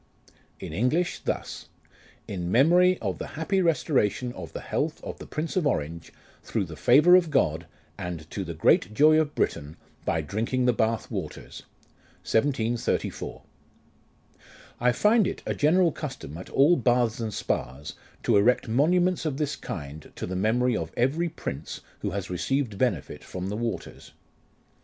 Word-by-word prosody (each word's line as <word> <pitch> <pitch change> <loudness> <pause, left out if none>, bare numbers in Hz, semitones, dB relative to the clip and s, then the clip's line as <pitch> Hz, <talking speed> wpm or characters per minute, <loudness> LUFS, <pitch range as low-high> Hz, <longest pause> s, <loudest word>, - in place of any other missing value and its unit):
In - - -7
English 125 - 0
thus: - - -4 0.3
" - - -28
In 90 -3 -4
memory 175 - +5
of 95 -3 -2
the - - -5
happy 190 +4 +1
restoration 130 - +1
of 85 -6 -8
the - - -6
health - - -2
of - - -7
the - - -9
Prince 155 +2 -4
of 180 -6 +2
Orange, 80 - -3 0.3
through 110 -4 -2
the 80 -2 -9
favour 150 - +6
of 180 -3 +4
God, 80 - +1 0.3
and 90 -4 -5
to - - -3
the - - -6
great 105 +4 +3
joy 155 +3 +6
of 150 -2 -1
Britain, 75 +2 -2 0.3
by 80 - 0
drinking 115 - -1
the 125 - +4
Bath 110 -1 -1
waters. - - -6 0.6
1734." 120 -1 -1 1.4
I 125 +1 +3
find 210 - +3
it - - -5
a - - -1
general 170 +3 +3
custom 135 - -7
at 90 - -9
all 145 +6 +5
baths 120 -2 +2
and 110 -2 -3
spas, 70 -7 -3 0.3
to 115 - +4
erect 120 +5 +3
monuments 175 +9 +2
of 150 -4 -2
this 150 -1 -1
kind 75 -2 -7
to - - -4
the 90 - -4
memory 115 +5 +2
of - - -3
every 150 +8 +1
prince 75 - -6 0.2
who - - -2
has 100 -1 -4
received 110 +3 -1
benefit 110 - -1
from 90 +1 -5
the 105 - -3
waters. 115 +1 -5
120 Hz, 160 wpm, -26 LUFS, 95-155 Hz, 1.4 s, favour